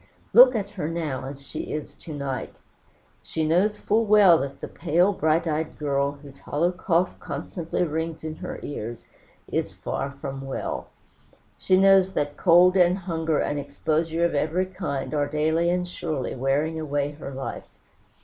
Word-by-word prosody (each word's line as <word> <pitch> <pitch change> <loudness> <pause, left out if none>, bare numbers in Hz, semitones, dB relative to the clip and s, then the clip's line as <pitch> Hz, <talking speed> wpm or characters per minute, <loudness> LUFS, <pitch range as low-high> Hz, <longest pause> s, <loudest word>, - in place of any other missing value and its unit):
Look 250 +1 +9
at 200 -2 -2
her 180 -7 -4
now, 155 -6 -3
as 140 +1 -8
she - - -6
is 150 -1 -5
to 165 - -11
night. 140 -3 -4 0.7
She 160 -1 -2
knows 190 +7 +2
full 220 +2 +1
well 205 -6 +6
that 140 0 -5
the - - -6
pale, 175 +6 +2
bright 160 -1 +1
eyed 155 0 -2
girl, 140 -1 0
whose 140 -1 -14
hollow 170 +5 0
cough 180 0 0
constantly 170 0 -3
rings 160 0 -3
in 155 0 -5
her 180 - -6
ears, 120 -5 -6 0.5
is - - -1
far 135 - -4
from 140 -1 -7
well. 135 - -4 0.7
She 185 - +2
knows 190 0 +5
that 145 0 -1
cold, 180 +3 +5
and 180 0 +4
hunger, 165 -4 -1
and 145 - -1
exposure 160 +4 -1
of 170 - 0
every 160 +5 +1
kind, 180 -8 -4
are 145 -1 +1
daily 160 +3 +1
and 180 0 0
surely 155 -6 -3
wearing 145 +5 0
away 145 -2 -1
her 145 -1 -8
life. 135 0 -6
160 Hz, 165 wpm, -25 LUFS, 145-180 Hz, 0.7 s, Look